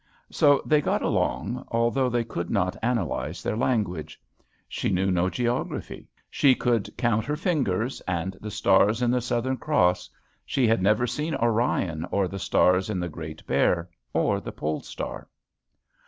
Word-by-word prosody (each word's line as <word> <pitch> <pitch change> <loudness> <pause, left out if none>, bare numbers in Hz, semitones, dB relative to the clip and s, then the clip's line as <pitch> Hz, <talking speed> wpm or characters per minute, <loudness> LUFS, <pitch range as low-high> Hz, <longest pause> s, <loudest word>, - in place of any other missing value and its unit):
So 145 -1 +4
they 150 -1 +3
got - - 0
along, 115 - -1
although 120 +3 +1
they 120 -1 0
could 85 -7 -5
not 95 -3 0
analyze 115 -7 -2
their - - -1
language. 95 - -1 0.5
She - - -2
knew 95 +1 +1
no 90 +1 +2
geography. 120 +6 -3 0.2
She 135 -3 +4
could 120 -5 0
count 120 -3 +1
her 150 - -1
fingers, 135 - -1
and 90 +1 -2
the 105 - -5
stars 105 +4 +3
in 120 - +3
the 125 0 +1
Southern 125 +2 -1
Cross. 90 - +1 0.3
She 130 - +1
had 115 -2 +3
never 105 +5 +3
seen 150 +6 -2
Orion, 110 -8 0
or 100 -2 +1
the 95 +2 -6
stars 90 +2 +2
in 100 -4 -1
the 90 0 -3
Great 80 -1 -8
Bear, 85 0 +1 0.2
or - - +1
the - - -6
Pole 75 +1 -3
Star. - - -6
110 Hz, 160 wpm, -26 LUFS, 90-125 Hz, 0.5 s, So